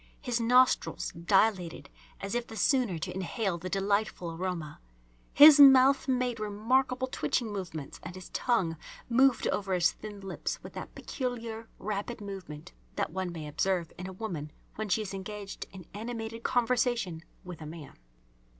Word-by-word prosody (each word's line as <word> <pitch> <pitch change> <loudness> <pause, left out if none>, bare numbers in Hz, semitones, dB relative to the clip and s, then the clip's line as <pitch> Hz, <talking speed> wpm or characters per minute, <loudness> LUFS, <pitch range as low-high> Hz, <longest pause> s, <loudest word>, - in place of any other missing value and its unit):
His 245 -4 -1
nostrils 250 +2 +3
dilated 180 0 +1 0.3
as 195 0 -4
if 240 0 -1
the 225 - -9
sooner 245 - +2
to 160 - -4
inhale 190 0 -2
the 185 +2 -5
delightful 195 -2 0
aroma. 165 -3 -4 0.5
His 295 0 +9
mouth 270 0 +8
made 250 -3 0
remarkable 250 +5 +1
twitching 235 -3 -1
movements 170 -7 -6
and 180 - -8
his 185 -1 -10
tongue 190 -10 0 0.3
moved 260 +2 +4
over 195 -2 -1
his 175 -2 +3
thin 205 -2 -9
lips 195 -1 -4
with - - -10
that - - -8
peculiar 230 -3 -5
rapid 210 +4 -4
movement 190 - -8 0.2
that - - -1
one 185 0 -3
may 160 -3 -6
observe 170 +3 -1
in 180 - -7
a - - -6
woman 175 -8 -5 0.2
when 215 -1 -4
she 215 +4 +2
is 200 - -7
engaged 200 +1 -6
in 185 -3 -11
animated 225 +1 -5
conversation 235 -8 0 0.2
with 180 -3 -9
a 155 - -7
man. 155 -1 -9
205 Hz, 155 wpm, -30 LUFS, 180-240 Hz, 0.5 s, His